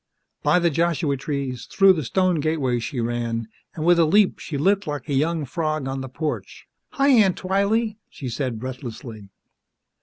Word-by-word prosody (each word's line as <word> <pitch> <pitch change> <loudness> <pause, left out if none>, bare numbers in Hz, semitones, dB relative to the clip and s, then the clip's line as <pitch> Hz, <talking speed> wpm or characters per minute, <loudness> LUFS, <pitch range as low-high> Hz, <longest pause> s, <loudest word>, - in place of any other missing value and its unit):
By - - +3
the 170 -1 +2
Joshua 165 -2 +1
trees, 135 -2 -4
through 195 -1 +5
the 160 -4 -3
stone 185 +5 +1
gateway 145 -5 0
she 120 +3 -4
ran, 115 -1 -2 0.3
and 155 - -3
with 175 0 +5
a 165 - +6
leap 200 +5 +3
she 150 - -5
lit 195 +6 +2
like 145 0 -4
a 145 - -2
young 155 +3 +1
frog 155 0 -2
on 135 0 -3
the 130 - -6
porch. 150 +4 -5 0.3
"Hi, 275 +1 +2
Aunt 215 -9 +5
Twylee!" 205 +4 0
she 135 - -8
said 125 -1 -3
breathlessly. 120 -4 -7
155 Hz, 175 wpm, -23 LUFS, 130-180 Hz, 0.3 s, a